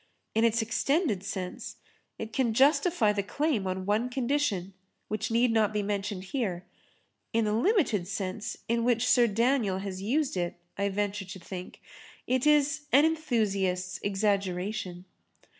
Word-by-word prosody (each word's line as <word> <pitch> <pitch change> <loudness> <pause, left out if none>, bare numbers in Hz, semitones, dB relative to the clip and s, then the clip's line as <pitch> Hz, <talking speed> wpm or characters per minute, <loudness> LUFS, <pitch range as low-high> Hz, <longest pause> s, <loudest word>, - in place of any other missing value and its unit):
In 225 - +2
its 230 0 +3
extended 235 - +1
sense 190 -2 -5 0.4
it 220 0 -6
can 240 -5 +1
justify 275 - +4
the 205 - 0
claim 235 -1 -1
on 185 0 -3
one 215 +5 +1
condition 245 -7 -1 0.4
which 215 0 -2
need 235 +1 +3
not 220 -2 +3
be 210 -1 -1
mentioned 200 -1 -3
here; 190 -5 -3 0.7
in 225 -1 +2
the 210 - 0
limited 240 - +2
sense 195 +1 -4
in 235 0 +1
which 240 0 +2
Sir 240 -2 +5
Daniel 230 -2 +1
has 190 -1 -5
used 270 +7 0
it, 175 -1 -1 0.2
I 200 +1 0
venture 205 0 -2
to 190 +1 -8
think, 180 0 -8 0.4
it 255 +3 +1
is 295 0 +3
an 285 +3 +6
enthusiast's 200 - 0
exaggeration. 195 -2 -1
215 Hz, 145 wpm, -29 LUFS, 195-250 Hz, 0.7 s, an